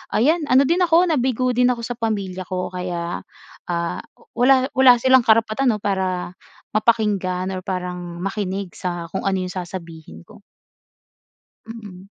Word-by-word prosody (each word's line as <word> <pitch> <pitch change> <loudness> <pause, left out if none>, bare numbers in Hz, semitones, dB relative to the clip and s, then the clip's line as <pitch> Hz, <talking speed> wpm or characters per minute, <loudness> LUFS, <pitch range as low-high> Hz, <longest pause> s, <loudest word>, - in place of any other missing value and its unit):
Ayan, 305 +6 +2
ano 260 +1 +5
din 335 +6 +1
ako, 345 -1 +4
nabigo 255 -2 +1
din 245 0 +3
ako 240 -2 -1
sa 235 - -4
pamilya 195 -5 -3
ko 185 -1 -3
kaya, 175 -1 -4 0.5
ah, 170 -1 -2 0.4
wala 260 +1 +4
wala 260 -2 +6
silang 260 -1 +5
karapatan, 225 +3 +3
‘no, 210 - -8
para 185 -3 -1 0.5
mapakinggan 200 -5 +1
or 185 - -4
parang 180 -2 -5
makinig 195 -1 -3
sa 175 -2 -4
kung 190 - -4
ano 190 -1 0
yung 180 - -5
sasabihin 170 - -8
ko. - - -17 1.2
Mm. 210 -5 -10
200 Hz, 145 wpm, -21 LUFS, 180-250 Hz, 1.2 s, wala